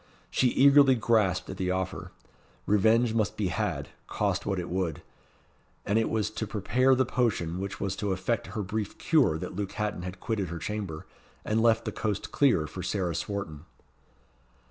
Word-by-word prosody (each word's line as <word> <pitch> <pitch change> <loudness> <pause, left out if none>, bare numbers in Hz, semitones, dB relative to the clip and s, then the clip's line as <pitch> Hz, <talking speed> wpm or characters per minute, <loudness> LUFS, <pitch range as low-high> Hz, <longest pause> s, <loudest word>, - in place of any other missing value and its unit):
She 130 - +3
eagerly 140 +1 +6
grasped 110 -6 +1
at 95 - -7
the 95 -1 -1
offer. 95 0 -3 0.5
Revenge 110 +3 +3
must 110 -3 0
be 100 -4 0
had, 75 - -2 0.2
cost - - -1
what 100 -1 0
it 90 -1 -3
would. 90 -4 -2 0.8
And 105 +3 +2
it 115 - 0
was 110 -1 -1
to 110 0 -4
prepare 125 +6 +2
the 130 0 +2
potion 95 -9 0
which 100 +1 -5
was 100 -1 -2
to 105 -2 -1
effect 100 +4 -1
her 105 - -1
brief 105 +1 -4
cure 135 - +3
that 80 - -6
Luke 100 0 -3
Hatton 105 -3 -2
had 90 +1 -7
quitted 105 -3 -2
her 85 +1 -5
chamber, 95 -3 -5 0.4
and 110 +1 +1
left 115 0 +3
the - - -2
coast 105 0 -3
clear 120 - +3
for 75 - -7
Sarah 90 -4 -1
Swarton. 85 -4 -4
105 Hz, 175 wpm, -28 LUFS, 90-115 Hz, 0.8 s, eagerly